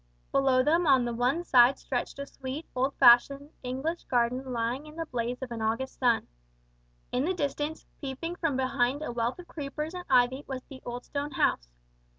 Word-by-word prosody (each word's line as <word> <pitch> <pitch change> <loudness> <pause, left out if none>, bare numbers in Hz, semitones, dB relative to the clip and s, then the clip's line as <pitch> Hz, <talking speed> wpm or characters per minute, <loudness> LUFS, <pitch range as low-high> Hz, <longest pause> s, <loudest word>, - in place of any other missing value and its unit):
Below 265 -2 +3
them 330 +4 +2
on 265 -3 +5
the 240 - -2
one 250 +8 +1
side 255 -3 +5
stretched 250 -2 -3
a 280 - -4
sweet 275 +3 -7
old 265 +2 0
fashioned 275 +5 +5
English 265 +7 -3
garden 250 +2 0
lying 245 +5 -2
in 305 - -12
the 330 0 -3
blaze 245 -1 -3
of 250 - -6
an 230 -1 -4
August 230 +4 -2
sun. 240 -3 +3 0.9
In 250 - +1
the 370 +5 0
distance, 295 0 -3
peeping 285 +5 -5
from 320 -7 0
behind 265 +2 0
a 275 - -3
wealth 235 +1 -1
of 355 -1 -11
creepers 300 +2 -5
and 360 -1 -6
ivy 255 +1 +3
was 260 -2 -5
the 270 -2 -12
old 245 +1 -5
stone 285 0 -3
house. - - +1
265 Hz, 185 wpm, -28 LUFS, 245-295 Hz, 0.9 s, on